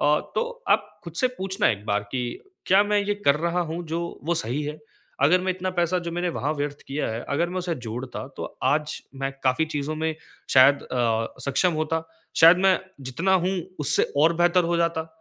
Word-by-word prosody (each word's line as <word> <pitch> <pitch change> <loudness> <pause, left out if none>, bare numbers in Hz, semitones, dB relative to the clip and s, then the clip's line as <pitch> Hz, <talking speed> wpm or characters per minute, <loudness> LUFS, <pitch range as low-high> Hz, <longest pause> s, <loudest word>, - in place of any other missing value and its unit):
अ, 150 +1 +3
तो 485 +1 -3
आप - - +2
खुद 170 - -7
से - - +5
पूछना 190 +2 +1
एक 105 -1 -4
बार 100 0 +1
कि 125 -1 -1 0.4
क्या 195 +2 +6
मैं 210 0 +2
ये 205 +1 0
कर 140 +1 +5
रहा 170 +2 0
हूँ 175 +1 -4
जो 165 +2 -2 0.2
वो 170 +1 +1
सही 145 -2 -1
है? 150 +1 -5 0.4
अगर 175 +6 +5
मैं 185 +1 -1
इतना 185 0 -3
पैसा 175 0 +1
जो 170 - -2
मैंने 175 +1 -1
वहाँ 150 -3 -1
व्यर्थ 145 0 -4
किया 140 +2 -2
है 115 +1 -3
अगर 165 +5 +1
मैं 185 +1 -3
उसे 175 -2 -2
जोड़ता 125 +4 -5
तो - - -4 0.2
आज 150 +1 +1 0.3
मैं 135 - 0
काफ़ी 130 +5 +3
चीज़ों 145 +2 -2
में 160 0 -1 0.4
शायद 140 +2 +6
अ, 115 -2 -1
सक्षम 140 +6 +1
होता। 155 +1 -1 0.3
शायद 165 +2 +8
मैं 190 -1 +4 0.3
जितना 165 +9 0
हूँ 185 - +1 0.3
उससे 145 - +4 0.2
और 160 +3 +5
बेहतर 175 +1 +3
हो 170 +1 +1
जाता। 170 -1 0
160 Hz, 205 wpm, -25 LUFS, 140-180 Hz, 0.4 s, शायद